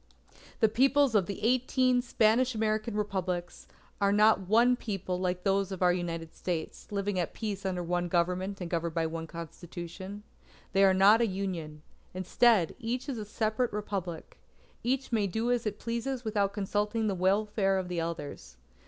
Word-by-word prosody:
The 220 - +7
Peoples 270 +3 +3
of 200 -5 +3
the 200 0 -6
eighteen 255 +1 +3
Spanish 240 +1 +2
American 215 0 -1
Republics, 185 -4 -3 0.3
are 200 0 +4
not 210 -2 +4
one 235 +5 +5
People 195 -6 -3
like 180 -1 -1
those 195 0 +1
of 190 -1 -2
our 180 0 +5
United 165 -2 -4
States, 170 +1 -5
living 200 -1 -1
at 175 - -2
peace 200 -3 -3
under 180 -2 -2
one 175 +1 -1
Government 180 +3 0
and 180 - -4
governed 170 -1 -2
by 165 -1 +1
one 165 0 -4
Constitution. 175 +4 -8 0.5
They 195 +1 +4
are 190 -1 +5
not 205 +4 +6
a 235 - +3
Union. 175 -6 -4 0.3
Instead, 185 0 +3
each 245 +3 -3
is 250 -5 -3
a 210 - -5
separate 220 +3 -1
Republic. 195 -5 -5 0.4
Each 260 +2 -1
may 215 -3 +2
do 225 +6 -1
as 240 -2 0
it 210 0 -3
pleases 235 +3 -3
without 205 -2 +1
consulting 210 +2 -1
the 205 - +1
welfare 195 +1 +1
of 185 -1 -2
the 175 -2 -2
others. 150 - -6
200 Hz, 170 wpm, -30 LUFS, 180-220 Hz, 0.5 s, The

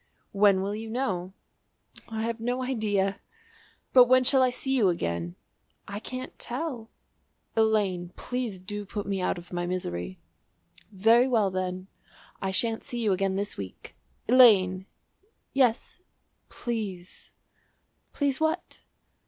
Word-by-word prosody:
"When 200 -1 +4
will 200 +1 -2
you 220 +1 -6
know?" 190 -7 -2 0.8
"I 220 -1 -3
have 230 0 -2
no 245 +3 -1
idea!" 205 -6 0 0.7
"But 250 -1 +9
when 255 +1 +5
shall 265 +1 +4
I 255 - +4
see 265 +2 -1
you 215 -7 +4
again?" 85 - -2 0.5
"I 200 +1 -5
can't 255 +3 -7
tell." 245 -3 -4 0.7
"Elaine, 205 -6 +1
please 245 -5 -3
do 205 +3 -6
put 205 +1 -5
me 195 -1 -2
out 180 - 0
of 175 +1 -11
my 175 0 -2
misery." 90 - -3 0.7
"Very 225 +6 +4
well 220 -6 +2
then 185 0 -3 0.6
I 195 - -1
shan't 225 +4 0
see 240 - -5
you 210 - +2
again 190 0 0
this 200 +1 -2
week." 95 -2 -9 0.3
"Elaine!" 195 -7 +6 0.7
"Yes." 255 -4 +1 0.5
"Please." 205 -7 -5 0.8
"Please 285 -1 -1
what?" 315 +2 -1
210 Hz, 130 wpm, -27 LUFS, 185-245 Hz, 0.8 s, But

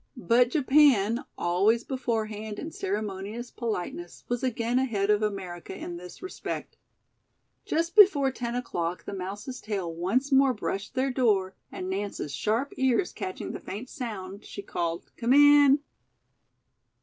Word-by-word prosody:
But 245 0 +3
Japan, 260 -4 +4
always 200 +7 +2
beforehand 220 -5 -3
in 320 - -5
ceremonious 205 +3 -4
politeness, 180 -6 -4
was 245 -1 -1
again 240 -1 0
ahead 210 -6 +1
of 210 0 +3
America 190 -4 -4
in 175 -1 -6
this 180 - -11
respect. 370 - -5 0.9
Just 335 +2 -1
before 325 -11 +7
ten 240 -2 -4
o'clock 175 -8 -3
the - - -5
mouse's 200 +7 -6
tail 195 -6 -3
once 215 - 0
more 270 -1 +5
brushed 205 +2 -4
their 265 +1 +1
door 205 -7 +2 0.2
and 185 - -5
Nance's 190 -6 -3
sharp 220 - -1
ears 265 +7 +2
catching 375 0 -5
the - - -6
faint 230 +6 -7
sound, 205 -6 -6
she 200 - -8
called, 170 -2 -3
"Come 235 +2 +2
in." 290 0 +7
225 Hz, 135 wpm, -27 LUFS, 195-260 Hz, 0.9 s, before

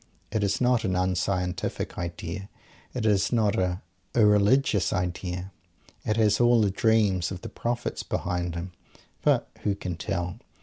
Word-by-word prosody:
It 110 -1 0
is 100 -1 +1
not 125 -2 +3
an 95 -4 0
unscientific 90 0 -1
idea. 85 +2 -5 0.5
It 120 -3 -1
is 100 -3 +3
not 110 -3 +2
an 90 0 0 0.3
irreligious 105 0 +4
idea. 90 0 -3 0.5
It 110 - 0
has 105 -2 +3
all 120 -1 +5
the 100 -2 +2
dreams 105 -4 +2
of 95 -1 -6
the 115 - -6
Prophets 120 +3 -3
behind 90 -1 -2
it. 85 +1 -3 0.6
But - - +3
who 100 - 0
can 90 -3 -5
tell? 90 0 -3
100 Hz, 145 wpm, -27 LUFS, 90-110 Hz, 0.6 s, all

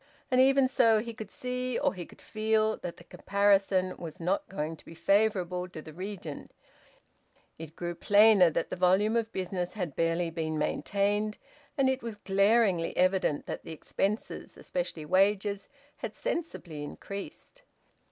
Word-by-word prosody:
And 255 0 +5
even 270 0 +5
so, 230 -3 +4
he 230 +2 -3
could 220 -2 -8
see, 250 +1 -3
or 285 0 +1
he 180 -3 -7
could - - -17
feel, 220 0 +1
that 175 - -7
the - - -14
comparison 195 -1 +2
was 165 -3 -8
not 180 +4 -1
going 160 -3 -3
to - - -18
be 165 - -12
favourable 185 -2 +1
to 175 - -9
the 155 0 -10
regent. 185 -4 -7 1.1
It 160 -1 -9
grew 175 0 -4
plainer 205 0 +6
that 155 - -2
the - - -1
volume 190 +5 +3
of 230 -1 0
business 180 -2 -3
had 180 -9 -4
barely 165 0 0
been 160 -1 -2
maintained, 205 +7 0 0.4
and 270 -1 +3
it 265 0 +1
was 230 -2 -5
glaringly 200 -3 +2
evident 185 -5 +2
that - - -5
the 165 - -7
expenses, 200 +6 -3
especially - - -4
wages, 200 +3 +1 0.3
had - - -6
sensibly 315 - -4
increased. 200 - -8
195 Hz, 155 wpm, -29 LUFS, 175-220 Hz, 1.1 s, plainer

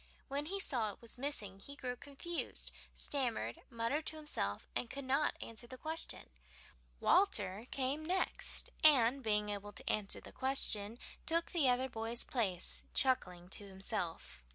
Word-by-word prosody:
When 285 +2 -2
he 395 +3 -2
saw 235 - 0
it - - -15
was 235 +1 -4
missing 215 -9 -2
he 280 +8 -9
grew 250 -3 -4
confused, 285 +6 -3 0.2
stammered, 235 - -1
muttered 235 +7 -2
to 315 - 0
himself, 295 - -3
and 240 - -1
could 275 +1 -6
not 275 +4 +1
answer 230 +1 -5
the 255 - -9
question. 315 - -1 0.7
Walter 215 - +2
came 275 +3 -1
next, 365 +4 +1
and, 275 -3 +6
being 210 -3 +1
able 205 0 -5
to - - -7
answer 210 -2 +1
the - - -12
question, 230 -5 +4 0.3
took 335 +1 +2
the 310 -8 +3
other 250 +1 +2
boy's 230 0 +2
place, 210 - 0
chuckling 180 -10 +2
to 200 +1 -4
himself. 190 - -3
245 Hz, 155 wpm, -36 LUFS, 205-285 Hz, 0.7 s, and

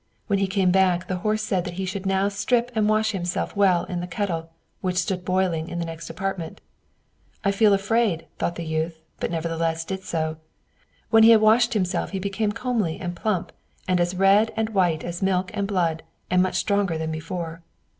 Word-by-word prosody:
When 200 -3 +1
he 195 - +1
came 190 -1 +2
back, 185 -1 +2
the 185 - -2
horse 215 +4 0
said 190 -4 0
that 180 - -5
now - - -10
he 190 +1 -2
should 195 +1 0
strip 235 +4 0
and 215 -2 +2
wash 215 0 +2
himself 180 -1 -3
well 190 -4 +4
in 180 - -4
the 175 - -4
kettle, 170 -3 -3 0.3
which 180 -1 -1
stood 180 0 -1
boiling 180 -3 0
in 175 - -5
the 170 - -2
next 165 0 -7
apartment. 180 0 -4 0.9
"I 200 - +4
feel 205 +1 +4
afraid," 200 -3 +1
thought 170 - -1
the 170 - -5
youth, 160 +1 -2 0.2
but - - -1
nevertheless 165 0 -1
did 190 +2 -4
so. 160 -3 -2 0.7
When 225 -1 +7
he 225 - +8
had 225 -2 +7
washed 220 +2 +4
himself, 185 -3 0
he 195 - -3
became 200 +2 -1
comely 225 -7 -1
and 175 -1 -4
plump, 200 -1 -1 0.4
and 185 -1 +2
as 175 +1 0
red 195 +4 +4
and 220 0 0
white 180 -7 +1
as 175 0 -5
milk 190 0 +1
and 200 -2 -1
blood, 170 -5 0 0.3
and 180 0 +4
much 185 0 0
stronger 195 -3 +1
than 160 0 -3
before. 165 +1 -5
185 Hz, 200 wpm, -24 LUFS, 170-205 Hz, 0.9 s, he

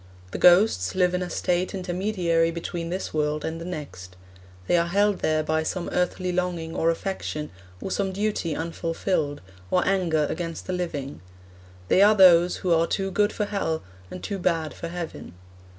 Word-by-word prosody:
The - - -4
ghosts 175 - +5
live 180 -1 +3
in 180 - 0
a 180 - -3
state 180 +2 -1
intermediary 180 -3 0
between 170 0 -4
this 185 +2 -4
world 150 0 -1
and 165 +1 -4
the - - -6
next. 140 - -7 0.5
They - - +2
are 170 0 +2
held 200 +2 +2
there 155 0 +1
by 160 +1 0
some 175 +2 -3
earthly 180 +1 0
longing 175 -2 -2
or 165 - +2
affection, 165 -3 -3 0.3
or 190 - -5
some 195 -1 0
duty 200 -5 -1
unfulfilled, 165 -2 -2 0.3
or 180 - +2
anger 175 -6 +2
against 165 0 -5
the 185 - -3
living; 150 -6 -4 0.7
they 185 - +4
are 210 +2 +7
those 180 -3 +6
who 175 - +4
are 165 0 +3
too 195 0 -1
good 205 +2 +2
for 210 - -2
hell, 195 -6 -2 0.3
and 180 - -8
too 200 -2 -3
bad 165 -4 0
for - - -6
heaven. 170 - -7
175 Hz, 175 wpm, -25 LUFS, 160-185 Hz, 0.7 s, are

